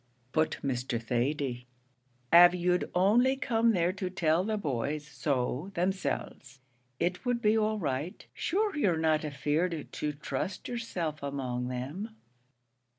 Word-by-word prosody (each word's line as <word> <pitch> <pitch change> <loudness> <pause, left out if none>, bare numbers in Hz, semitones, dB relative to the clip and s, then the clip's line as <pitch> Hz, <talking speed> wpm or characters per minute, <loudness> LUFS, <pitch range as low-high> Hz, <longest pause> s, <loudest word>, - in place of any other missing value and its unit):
"But, 155 +2 +1
Mr. 125 -3 -1
Thady, 125 +1 -1 0.7
av 175 +1 +9
you'd 180 0 +1
only 230 +9 +4
come 230 -3 +2
there 175 -1 +2
to 190 -1 -3
tell 175 -2 +2
the 215 +1 -1
boys 145 - -2
so 140 +2 -2
themselves, 155 -7 -2 0.4
it 180 +1 -1
would 245 -1 0
be 215 -1 +3
all 215 0 +1
right. 150 -1 -3
Shure 415 +2 0
you're 195 - +2
not 160 -1 +2
afeard 150 +3 -1
to 150 - -2
trust 160 +6 -4
yerself 180 -11 -3
among 130 -3 -3
them." 145 - -5
165 Hz, 130 wpm, -30 LUFS, 140-195 Hz, 0.7 s, av